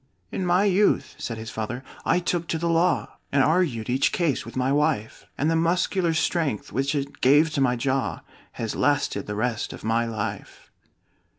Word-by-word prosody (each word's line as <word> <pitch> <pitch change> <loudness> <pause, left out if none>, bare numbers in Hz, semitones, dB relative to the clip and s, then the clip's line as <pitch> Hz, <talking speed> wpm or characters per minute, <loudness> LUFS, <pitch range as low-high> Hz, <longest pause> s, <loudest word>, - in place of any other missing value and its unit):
"In 185 - -2
my 180 +3 +4
youth," 205 0 +2
said 115 - -4
his 110 0 -7
father, 120 +4 -4 0.2
"I 165 - +3
took 175 -1 -1
to 165 - -1
the 170 +1 -1
law, 170 +2 +1
And 140 -1 +4
argued 150 -8 +1
each 130 +2 +2
case 160 -9 0
with 115 - -9
my 130 +1 +1
wife; 140 -7 0
And 145 - +1
the 165 - +2
muscular 170 +1 +1
strength 160 - -1
which 135 +3 0
it 140 0 -4
gave 145 +5 +5
to 145 - -1
my 125 -2 +3
jaw, 130 +2 -1 0.3
Has 115 -2 -4
lasted 145 -8 0
the 105 - -3
rest 115 +1 -2
of - - -11
my 115 +2 +1
life." 105 -2 -6
140 Hz, 185 wpm, -25 LUFS, 115-165 Hz, 0.3 s, gave